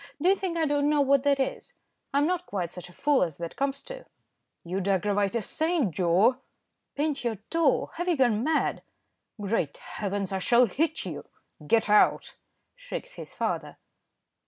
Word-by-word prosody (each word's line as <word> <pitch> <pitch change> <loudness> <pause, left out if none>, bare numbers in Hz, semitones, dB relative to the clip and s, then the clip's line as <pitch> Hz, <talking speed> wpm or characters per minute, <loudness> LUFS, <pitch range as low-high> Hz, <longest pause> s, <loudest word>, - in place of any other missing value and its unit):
Do 345 +5 +3
you - - +7
think 370 -3 -3
I 325 - +2
don't 290 0 +1
know 300 -1 +3
what 280 -1 +4
that 280 0 +2
is? 265 - -3 0.4
I'm 280 +1 +2
not 360 +1 -1
quite 180 -4 -3
such 180 0 -9
a - - -14
fool 285 +9 +2
as 165 -5 -1
that 170 -1 -6
comes 275 0 -2
to." - - -9 0.6
"You'd 185 +2 -3
aggravate 200 +2 +1
a 230 - 0
saint, 315 - 0
Joe." 185 - +3 0.6
"Paint 290 -1 -1
your 235 -2 -1 0.2
toe! 330 -4 +2
Have 350 +1 -2
you 345 -3 +2
gone 240 -4 +2
mad?" 315 +2 0 0.6
"Great 195 -8 -1
heavens! 200 -2 -4
I 190 - 0
shall 240 +6 +5
hit 315 - -1
you; - - -6 0.4
get 225 +3 +3
out," 210 0 +3 0.4
shrieked - - -7
his - - -11
father. - - -3
265 Hz, 175 wpm, -27 LUFS, 200-310 Hz, 0.6 s, you